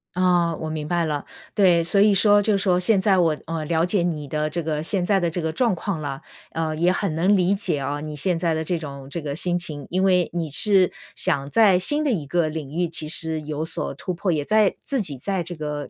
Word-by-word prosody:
啊， 175 -2 +2
我 160 0 -5
明 155 -1 -4
白 170 -1 0
了。 150 -2 -3 0.3
对， 175 -4 +4
所 195 +4 +2
以 210 0 +5
说 205 +1 +5
就 205 -1 +1
说 185 -2 +2
现 195 +2 +3
在 190 0 +3
我 160 -3 +2
呃， 165 -1 -4
了 165 +1 +1
解 185 +1 +1
你 160 -4 -2
的 150 +2 -2
这 170 +2 -3
个 155 -1 -2
现 180 +2 -1
在 195 -1 +2
的 175 - 0
这 175 +2 -4
个 160 0 -2
状 230 +3 +1
况 175 -2 -4
了， 140 -2 -5 0.3
呃， 160 -1 -2
也 170 +3 +2
很 185 -2 -2
能 185 +5 +3
理 180 +2 +2
解 195 -6 -1
啊， 140 +2 -3
你 155 0 -6
现 170 +4 0
在 165 -1 0
的 160 - -2
这 175 +2 -1
种 140 -3 -9
这 170 - -4
个 145 -1 -4
心 175 +1 +1
情。 150 -5 -5
因 185 +2 0
为 180 -3 +3
你 165 -3 -3
是 190 +4 +3 0.2
想 140 -6 0
在 205 -2 +5
新 290 +12 +2
的 285 - +1
一 165 -10 -2
个 165 +2 0
领 155 -3 -6
域 175 +1 -1
其 155 -2 -1
实 160 0 -1
有 150 0 -4
所 160 - -4
突 185 - -5
破， 175 +1 -1
也 150 -3 -1
在 215 -2 +3
自 275 -5 -1
己 150 -9 -4
在 190 +3 -2
这 175 +1 -7
个， 150 -1 -5
170 Hz, 270 characters per minute, -23 LUFS, 155-185 Hz, 0.3 s, 以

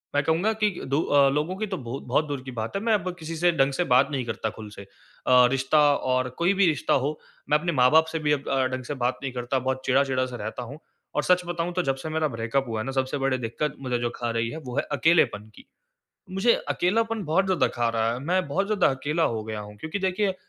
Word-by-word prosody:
मैं 145 - +3
कहूँगा 170 +9 +1
कि 215 -1 +1 0.2
दो 140 +3 +1
अ, 140 -3 +4
लोगों 150 +6 -1
की 215 0 -2
तो 190 - -3
बहुत 130 -1 -6
बहुत 140 +5 0
दूर 145 -3 -4
की 130 - -7
बात 115 - -5
है, 195 - -1
मैं 225 0 +2
अब 185 -3 0
किसी 165 +1 -6
से 175 +2 +3
ढंग 135 -4 +2
से 180 - 0
बात 130 +3 +5
नहीं 135 -4 -2
करता 110 -1 -3
ख़ुल 110 0 -10
से। - - -9 0.5
अ, 125 -1 +7
रिश्ता 135 +3 +2 0.2
और 130 -1 0
कोई 175 +3 +3
भी 195 0 +3
रिश्ता 155 - +1
हो 145 +3 0 0.3
मैं 150 - +5
अपने 170 +2 -1
माँ-बाप 150 +4 +5
से 160 - -2
भी 150 -1 0
अ, 150 - +4
ढंग 130 -1 -1
से 135 - -4
बात 125 -1 -1
नहीं 135 - -3
करता 125 +1 -1
बहुत 130 +1 -2
चिढ़ा-चिढ़ा-सा 130 -1 +1
रहता 110 +3 -5
हूँ। 140 +6 -9 0.4
और 150 - +1
सच 180 0 +3
बताऊँ 175 0 -2
तो 180 - +1
जब 135 -3 0
से 135 +4 -7
मेरा 155 0 0
ब्रेकअप 120 +1 -2
हुआ 115 -1 -3
है 110 - -3
ना 135 - -3
सबसे 130 +1 -1
बड़ी 135 -1 0
दिक़्क़त 130 +5 -3
मुझे 125 -2 -1
जो 120 - -1
ख़ा 120 - -3
रही 115 0 0
है 155 - -6
वो 125 -4 -7
है - - +2
अकेलेपन 140 -9 +2
की। - - -15 0.7
मुझे 195 +6 +3
अकेलापन 225 +4 0
बहुत 170 +5 +2
ज़्यादा 185 -4 +2
ख़ा 120 -1 +1
रहा 115 0 0
है। 120 - -4
मैं 180 +6 0
बहुत 195 +8 0
ज़्यादा 215 -1 +2
अकेला 150 +5 -1
हो 110 -6 0
गया 110 -1 -5
हूँ 105 0 -10
क्योंकि 160 - -4
देखिए 190 +1 0
140 Hz, 250 wpm, -25 LUFS, 125-170 Hz, 0.7 s, अ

